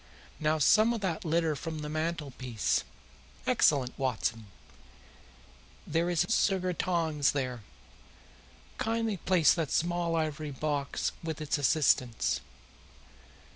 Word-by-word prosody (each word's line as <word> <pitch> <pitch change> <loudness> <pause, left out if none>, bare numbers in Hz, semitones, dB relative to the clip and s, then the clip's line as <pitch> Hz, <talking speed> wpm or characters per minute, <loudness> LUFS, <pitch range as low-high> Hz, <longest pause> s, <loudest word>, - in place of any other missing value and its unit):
Now 155 0 +1
some 215 +10 +5
of 230 - -4
that 175 -5 -2
litter 165 -1 +1
from 160 +4 -5
the - - -4
mantelpiece. 145 - -2 0.6
Excellent, 130 -4 +3
Watson! 115 -4 -1 1.4
There 165 +2 0
is 175 -2 +2
a - - -6
sugar 185 -4 +2
tongs 160 -5 +1
there. 130 -4 -3 1.2
Kindly 225 -3 -1
raise 170 -6 +5
that 165 -4 -2
small 170 0 0
ivory 155 -1 -2
box 145 0 -2
with 160 -2 -4
its 150 -1 -1
assistance. 130 -5 +2
155 Hz, 110 wpm, -30 LUFS, 140-170 Hz, 1.4 s, some